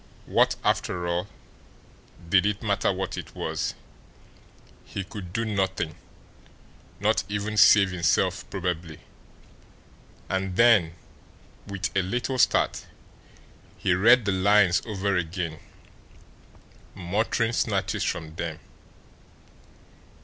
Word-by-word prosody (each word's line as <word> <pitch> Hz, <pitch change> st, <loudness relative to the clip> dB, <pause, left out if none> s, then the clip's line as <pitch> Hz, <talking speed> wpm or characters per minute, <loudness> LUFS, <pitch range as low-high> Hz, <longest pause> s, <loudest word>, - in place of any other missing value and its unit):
What, -, -, +2 dB
after 90 Hz, -1 st, 0 dB
all, 85 Hz, +2 st, -1 dB, 1.0 s
did 90 Hz, +1 st, +4 dB
it 105 Hz, +2 st, -2 dB
matter 100 Hz, -1 st, +1 dB
what 95 Hz, 0 st, -4 dB
it -, -, -10 dB
was; -, -, -3 dB, 1.1 s
he 100 Hz, -, -6 dB
could 95 Hz, -2 st, -9 dB
do 115 Hz, +4 st, -2 dB
nothing 95 Hz, -6 st, -1 dB, 1.1 s
not -, -, +1 dB
even 105 Hz, +1 st, -3 dB
save 100 Hz, -2 st, +6 dB
himself 85 Hz, -4 st, 0 dB
probably. 85 Hz, -4 st, -4 dB, 1.3 s
And 95 Hz, -1 st, -2 dB
then, 100 Hz, -8 st, +4 dB, 0.7 s
with 95 Hz, -4 st, -4 dB
a 95 Hz, -, +3 dB
little 125 Hz, +7 st, -2 dB
start, -, -, +2 dB, 0.9 s
he -, -, +1 dB
read 115 Hz, +6 st, +5 dB
the 100 Hz, -, +1 dB
lines 95 Hz, -1 st, +4 dB
over 100 Hz, -2 st, -1 dB
again, 85 Hz, -2 st, -3 dB, 1.4 s
muttering 110 Hz, +5 st, -1 dB
snatches -, -, -1 dB
from 80 Hz, -1 st, -3 dB
them. 85 Hz, -2 st, -4 dB
95 Hz, 100 wpm, -26 LUFS, 90-105 Hz, 1.4 s, save